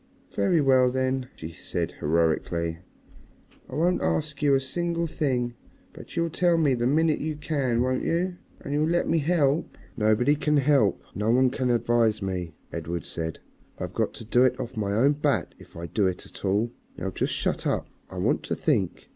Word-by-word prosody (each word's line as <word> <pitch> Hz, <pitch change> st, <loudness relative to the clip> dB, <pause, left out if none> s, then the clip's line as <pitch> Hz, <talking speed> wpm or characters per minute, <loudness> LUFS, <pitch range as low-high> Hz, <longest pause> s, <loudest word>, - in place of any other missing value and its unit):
"Very 125 Hz, -, +3 dB
well, 130 Hz, -2 st, +5 dB
then," 130 Hz, 0 st, -1 dB
she 80 Hz, +1 st, -8 dB
said -, -, -3 dB
heroically, 85 Hz, +1 st, 0 dB, 0.9 s
"I -, -, -7 dB
won't 175 Hz, +4 st, +2 dB
ask 150 Hz, -2 st, -1 dB
you 145 Hz, -2 st, +4 dB
a -, -, +3 dB
single 170 Hz, +5 st, -1 dB
thing. 130 Hz, -7 st, -1 dB, 0.4 s
But -, -, -12 dB
you'll 170 Hz, -1 st, 0 dB
tell 175 Hz, 0 st, +3 dB
me 150 Hz, -5 st, +3 dB
the 120 Hz, -1 st, +1 dB
minute 155 Hz, +3 st, +2 dB
you 155 Hz, 0 st, -2 dB
can, 135 Hz, -6 st, 0 dB
won't 130 Hz, 0 st, 0 dB
you? 175 Hz, +2 st, 0 dB, 0.2 s
And 140 Hz, -, -5 dB
you'll 150 Hz, +2 st, +2 dB
let 175 Hz, +1 st, +1 dB
me 165 Hz, -, +2 dB
help?" 150 Hz, -1 st, +1 dB, 0.2 s
"Nobody 110 Hz, +5 st, +3 dB
can 150 Hz, 0 st, +1 dB
help, 140 Hz, -7 st, +3 dB
no 105 Hz, +2 st, -1 dB
one 125 Hz, +2 st, +4 dB
can 130 Hz, -1 st, -1 dB
advise 115 Hz, -2 st, +2 dB
me," 90 Hz, -4 st, -4 dB, 0.2 s
Edred 85 Hz, +1 st, -4 dB
said. 80 Hz, -1 st, -4 dB, 0.4 s
"I've -, -, -5 dB
got -, -, -1 dB
to 115 Hz, -, -8 dB
do 120 Hz, +3 st, +4 dB
it 130 Hz, -, +2 dB
off 125 Hz, -, -5 dB
my 100 Hz, -2 st, -1 dB
own 130 Hz, +7 st, +4 dB
bat 145 Hz, -, 0 dB
if -, -, -14 dB
I 85 Hz, -, -5 dB
do 95 Hz, +4 st, +1 dB
it 90 Hz, -1 st, -3 dB
at -, -, -12 dB
all. 105 Hz, +4 st, +1 dB, 0.3 s
Now 90 Hz, -, -5 dB
you 95 Hz, -, -1 dB
just -, -, -1 dB
shut -, -, -1 dB
up, -, -, -1 dB, 0.2 s
I -, -, -9 dB
want -, -, +1 dB
to -, -, -1 dB
think." -, -, 0 dB
130 Hz, 195 wpm, -26 LUFS, 105-150 Hz, 0.9 s, well